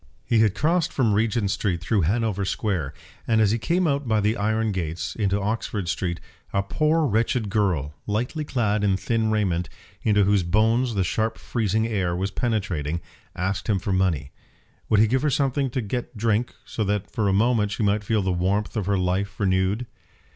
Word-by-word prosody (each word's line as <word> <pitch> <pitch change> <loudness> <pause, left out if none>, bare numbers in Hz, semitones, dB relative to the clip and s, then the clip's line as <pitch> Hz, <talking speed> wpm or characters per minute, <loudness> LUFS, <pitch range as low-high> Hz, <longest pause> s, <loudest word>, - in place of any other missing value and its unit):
He 115 - +2
had 110 -3 +3
crossed 165 +1 +1
from 115 -6 +2
Regent 105 -1 +1
Street 100 -4 -1
through 100 +4 +1
Hanover 100 +3 0
Square, 95 - -2 0.3
and 110 -1 +3
as 105 -2 +4
he 115 - 0
came 175 +11 +1
out 140 -3 0
by 110 -1 +2
the 105 +2 +1
iron 110 +1 0
gates 85 -3 -3
into 100 -2 +1
Oxford 105 -2 -2
Street, 85 +1 -2 0.3
a 100 - +1
poor 155 +9 +1
wretched 110 -2 0
girl, 90 -9 0
lightly 120 +9 -1
clad 110 -7 0
in 95 -2 +2
thin 110 +3 0
raiment, 95 -5 0 0.3
into 105 -2 +3
whose 100 0 +3
bones 110 +7 +2
the 95 - +2
sharp 110 +5 -1
freezing 110 -1 0
air 95 -6 -1
was 95 +2 -2
penetrating, 90 - -1 0.4
asked 95 +5 -2
him 105 - +3
for 95 +1 -2
money. 90 -7 0 0.6
Would 105 - +4
he 110 - +6
give 125 +4 +1
her 150 - +2
something 135 0 +1
to 125 +1 -2
get 120 +2 -4
drink, 115 +2 0
so 110 - -3
that 105 0 -2
for 105 -2 0
a - - +3
moment 110 +1 +2
she 105 - -2
might 105 +1 +1
feel 105 -1 +1
the 95 - 0
warmth 95 +5 0
of 105 -4 -2
her 100 -1 +2
life 95 +3 -1
renewed? 95 +3 +1
105 Hz, 190 wpm, -24 LUFS, 95-115 Hz, 0.6 s, he